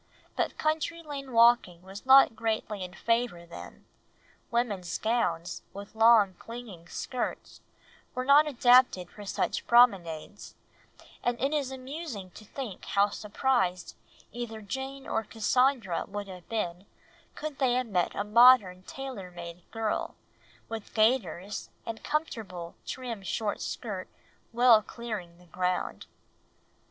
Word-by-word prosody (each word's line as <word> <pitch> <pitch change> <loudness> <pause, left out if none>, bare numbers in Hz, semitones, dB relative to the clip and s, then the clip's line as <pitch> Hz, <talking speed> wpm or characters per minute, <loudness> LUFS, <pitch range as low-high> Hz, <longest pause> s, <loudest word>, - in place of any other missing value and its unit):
But - - -1
country 320 +2 -1
lane 280 -3 -7
walking 230 -7 +4
was 195 +6 -11
not 265 -3 +8
greatly 220 -3 -2
in 180 0 -8
favour 230 -7 0
then, 170 - -11 0.6
women's 210 -7 -1
gowns, 215 -6 -1
with 200 +1 -9
long 225 -3 +6
clinging 225 -8 -9
skirts, 250 -2 -4 0.5
were 255 0 -2
not 290 +3 +6
adapted 245 -8 +4
for 205 - -10
such 195 - -2
promenades, 200 -7 +2 0.7
and 240 0 0
it 275 +3 0
is 285 -4 0
amusing 260 - -7
to 215 - -13
think 215 -2 -7
how 200 +1 +2
surprised 200 -5 -1 0.4
either 230 -1 -6
Jane 265 +6 -6
or 220 - -1
Cassandra 225 -2 +1
would 205 0 -5
have 180 -3 -11
been 190 -4 -3 0.5
could 305 -2 -6
they 260 -3 +3
have 255 +1 +1
met 185 -6 0
a 205 - -1
modern 210 -4 +6
tailor 250 -3 -7
made 170 0 -9
girl, 225 -1 -2 0.5
with 225 -2 -7
gaiters, 210 -4 +1 0.2
and 225 -1 -6
comfortable, 215 - -3
trim 245 -5 -5
short 205 +3 -2
skirt 200 -6 -5 0.4
well 240 -2 +6
clearing 210 -7 -7
the 180 - -19
ground. 180 +1 -2
225 Hz, 125 wpm, -29 LUFS, 190-250 Hz, 0.7 s, not